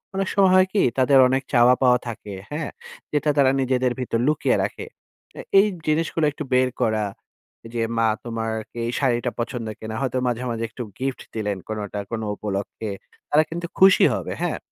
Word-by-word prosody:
অনেক 195 0 -1
সময় 195 -2 +5
হয় 185 0 +5
কি 205 - +3 0.2
তাদের 135 +1 +5
অনেক 135 +1 +1
চাওয়া 120 0 +6
পাওয়া 125 -1 +5
থাকে, 110 -3 -7 0.2
হ্যাঁ? 150 0 -3 0.4
যেটা 150 0 +1
তারা 135 -2 +5
নিজেদের 130 -1 +1
ভিতর 115 -2 -1
লুকিয়ে 150 0 +2
রাখে। - - -4 0.5
অ্যা - - -7 0.2
এই 205 - +5 0.2
জিনিসগুলো 160 +1 +1
একটু 145 - -6
বের 130 0 +4
করা। 110 -1 +1 0.7
যে, 115 - -1 0.2
"মা 115 -1 +3 0.2
তোমার 115 -1 -3 0.2
কি - - -14
এই - - -1
শাড়িটা 125 -2 +1
পছন্দ 120 -1 -3
কিনা?" 110 0 -6
হয়তো 130 -1 -1
মাঝে, 120 0 -1
মাঝে 115 0 -3
একটু 120 +2 -6 0.2
গিফট 135 0 -2
দিলেন 105 -3 -2
কোনটা 105 -1 -4
কোন 115 -1 -2
উপলক্ষে। 100 +1 -4 0.4
তারা 150 +1 +5
কিন্তু 170 +1 -4
খুশি 190 0 +7
হবে - - -4
হ্যাঁ? - - -1
125 Hz, 180 wpm, -23 LUFS, 115-145 Hz, 0.7 s, খুশি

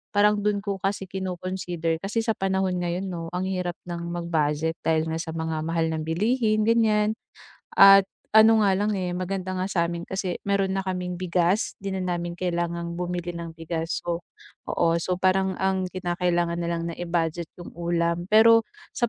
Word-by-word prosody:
Parang 210 0 +4
do'n 205 0 +1
ko 200 -2 -3
kasi 195 0 -2
kino-consider. 180 -3 -3
Kasi 210 +4 -1
sa 225 - +1
panahon 190 -1 0
ngayon, 175 +2 -2
'no, 170 -3 -5
ang 180 - -1
hirap 180 -2 -2
nang 170 0 -4
mag-budget 160 -2 0
dahil 160 0 +1
nga - - -1
sa 165 -1 -4
mga 160 -1 -2
mahal 165 0 0
na 160 - -2
bilihin, 215 +6 +1
ganiyan. 220 -2 +3 0.6
At 195 0 +9 0.3
ano 220 0 +7
nga 195 -2 +3
lang, 210 +2 0
eh, 180 -2 -2
maganda 185 0 -3
nga 185 - -1
sa 170 -3 +1
'min 170 0 -4
kasi 190 -1 -3
mayro'n 195 -1 +1
na 195 - -1
kaming 180 -1 -3
bigas. 180 +3 +1
'Di 195 - -4
na 190 -1 -2
namin 175 -1 -3
kailangang 170 -1 -2
bumili 175 0 -3
ng 170 -1 -7
bigas. 165 0 -3
So 170 0 -2 0.5
oo, 170 0 +2
so 180 +2 -1
parang 190 0 +1
ang 190 -1 0
kinakailangan 175 -1 -1
na 170 - -2
lang 170 -1 -1
na - - -5
i-budget 170 -1 -1
'yong 175 - -10
ulam. 170 0 -1
Pero 225 +2 +7 0.3
sa 240 - 0
180 Hz, 180 wpm, -25 LUFS, 170-195 Hz, 0.6 s, At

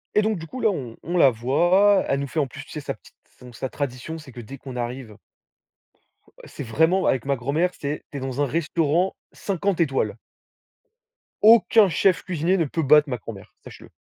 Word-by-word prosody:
et 210 - +5
donc 215 -2 0
du 160 - -8
coup 255 - -8
là 220 - +4
on, 130 - -5
on 175 +2 -2
la 140 - +7
voit, 175 - +3
elle 135 - 0
nous 140 - -3
fait 155 - -3
en 140 - +1
plus 145 +3 -10
tu 165 - -16
sais 150 - -5
sa - - -4
petite - - -21 0.2
son 125 -1 -13
sa 130 +4 -5
tradition, 140 +4 -5
c'est 150 -4 -12
que 120 - -8
dès 135 +5 -10
qu'on 130 -1 -10
arrive 120 -2 -5 1.3
c'est - - -8
vraiment 160 +11 +2
avec 130 -2 +1
ma 140 0 +1
grand-mère, 145 +8 0
c'est 145 +1 -4
tu 145 - -6
es - - -6
dans 135 +1 -3
un - - +3
restaurant 165 +4 0 0.2
50 195 -1 -2
étoiles. 135 -9 0 1.3
Aucun 220 -1 +6
chef 180 +2 +2
cuisinier 180 +1 0
ne 165 - +1
peut 160 +4 -2
battre 150 +1 +5
ma 125 - -2
grand-mère, - - -11
sache-le! - - -13
145 Hz, 205 wpm, -23 LUFS, 130-180 Hz, 1.3 s, la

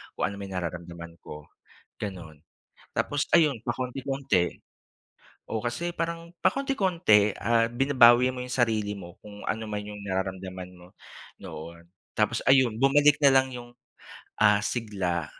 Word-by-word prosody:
kung - - -3
ano 100 - -8
man 100 - -6
'yon 95 - -9
nararamdaman 85 -1 -6
ko," 75 0 -10 0.6
gano'n. 85 -7 -7 0.5
Tapos 145 -1 0
ayun, 155 -6 +4
pakonti-konti, 130 -7 -1 1.0
oo. 110 - -2
Kasi 170 +9 -3
parang 170 0 -3
pakonti-konti, 185 - +2
ah, 115 -1 +3
binabawi 125 -2 +5
mo 130 - -6
yung 125 - -6
sarili 110 -4 +1
mo 90 -3 -10
kung 105 -1 -11
ano 110 +1 -2
man 105 -1 -4
yung 105 0 -9
nararamdaman 95 -1 -4
mo, 90 +2 -17 0.5
noon. 85 +2 -10 0.3
Tapos 110 +2 0
ayon, 130 -4 +4
bumalik 145 +3 +5
na 140 - +7
lang 130 0 +4
yung, 120 0 -9 0.7
ah, 105 -1 +5
sigla, 100 -8 -2
110 Hz, 135 wpm, -27 LUFS, 95-135 Hz, 1.0 s, na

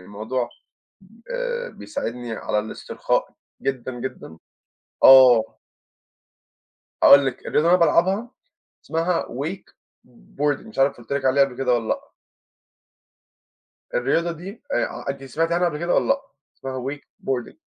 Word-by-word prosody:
الموضوع 110 +6 -4 0.8
آآ - - -3
بيساعدني 120 - -6
على 105 -1 -2
الاسترخاء 110 +1 -2 0.3
جدًا، 130 -1 -2
جدًا. 120 -10 -7 0.7
آه. 125 -4 +8 1.5
أقول 140 -1 +8
لِك، 130 - -4
الرياضة 160 +3 +2
اللى 180 - +6
أنا - - -4
بالعبها، 195 +9 +1 0.5
اسمها 165 +2 0
Wakeboarding. 145 - -5
مش 220 - -12
عارف 135 +1 +3
قُلت 120 +3 -10
لِك 140 -1 -1
عليها 135 +1 +5
قبل 125 -2 -8
كده، 125 -2 +1
والّا 115 -2 -2
لأ. 280 0 -3 1.8
الرياضة 170 - +1
دي، 185 +7 -10
آآ - - +1
ع - - -8
أنتِ 135 0 -7
سمعتي 165 +5 -1
عنها 175 0 +2
قبل 150 - -5
كده، 175 +2 0
والّا - - +2
لأ؟ 275 0 +2 0.4
اسمها 130 -1 -5
Wakeboarding. 135 -3 -5
140 Hz, 130 wpm, -23 LUFS, 125-175 Hz, 1.8 s, آه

